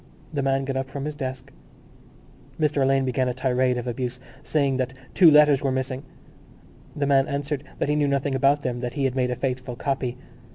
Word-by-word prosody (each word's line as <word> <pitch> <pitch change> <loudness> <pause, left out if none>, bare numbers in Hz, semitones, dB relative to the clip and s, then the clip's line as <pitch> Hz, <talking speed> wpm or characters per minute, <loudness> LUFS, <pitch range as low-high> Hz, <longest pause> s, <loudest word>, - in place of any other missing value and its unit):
The 145 - 0
man 135 0 +1
got 135 0 -3
up 135 0 -3
from 140 +1 -5
his 150 - -3
desk. 130 -3 -6 1.1
Mr 150 -2 +1
Alleyne 135 0 +3
began 130 0 0
a 125 - -2
tirade 130 -1 +1
of 120 - -4
abuse, 125 0 -3 0.2
saying 140 -3 +1
that 130 0 -2 0.2
two 175 -4 +7
letters 150 -2 +6
were 135 - 0
missing. 130 0 -2 0.9
The 145 - 0
man 135 -1 +3
answered 140 0 -3
that - - -1
he 150 - +1
knew 150 -1 +2
nothing 140 0 0
about 140 +2 +3
them, 125 -2 -2
that 120 -1 -4
he 140 - -1
had 130 -1 0
made 125 -1 +1
a 125 - -1
faithful 130 -1 -3
copy. 130 -1 -2
135 Hz, 205 wpm, -24 LUFS, 130-140 Hz, 1.1 s, two